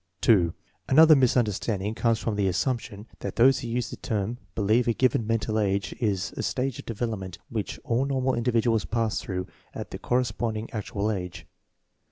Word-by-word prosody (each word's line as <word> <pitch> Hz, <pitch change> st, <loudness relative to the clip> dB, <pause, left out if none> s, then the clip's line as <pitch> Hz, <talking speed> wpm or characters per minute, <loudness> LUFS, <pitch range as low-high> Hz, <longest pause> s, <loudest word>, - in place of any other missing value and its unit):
2. 90 Hz, -7 st, +4 dB, 0.3 s
Another 155 Hz, +3 st, +8 dB
misunderstanding 110 Hz, -5 st, +1 dB
comes 115 Hz, 0 st, +1 dB
from 110 Hz, 0 st, -2 dB
the 100 Hz, -1 st, +1 dB
as 90 Hz, 0 st, 0 dB
sumption 115 Hz, -5 st, -2 dB
that -, -, -5 dB
those 130 Hz, +3 st, +5 dB
who 120 Hz, -, -5 dB
use 120 Hz, +1 st, -2 dB
the -, -, -5 dB
term 110 Hz, +3 st, -3 dB, 0.2 s
believe 110 Hz, +3 st, +2 dB
a 115 Hz, -, +3 dB
given 120 Hz, -3 st, +1 dB
mental 110 Hz, -1 st, 0 dB
age 100 Hz, -1 st, 0 dB
is 100 Hz, -6 st, -1 dB
a -, -, -3 dB
stage 130 Hz, -1 st, -2 dB
of -, -, -10 dB
development 110 Hz, -6 st, -4 dB
which 110 Hz, -3 st, -4 dB
all 130 Hz, -1 st, +1 dB
normal 130 Hz, -1 st, 0 dB
individuals 115 Hz, -2 st, +1 dB
pass 115 Hz, -2 st, -1 dB
through 90 Hz, -2 st, -3 dB, 0.3 s
at -, -, -6 dB
the -, -, -6 dB
corresponding 115 Hz, -2 st, -1 dB
actual 105 Hz, -1 st, -2 dB
age. 90 Hz, -4 st, -5 dB
115 Hz, 175 wpm, -26 LUFS, 100-120 Hz, 0.3 s, Another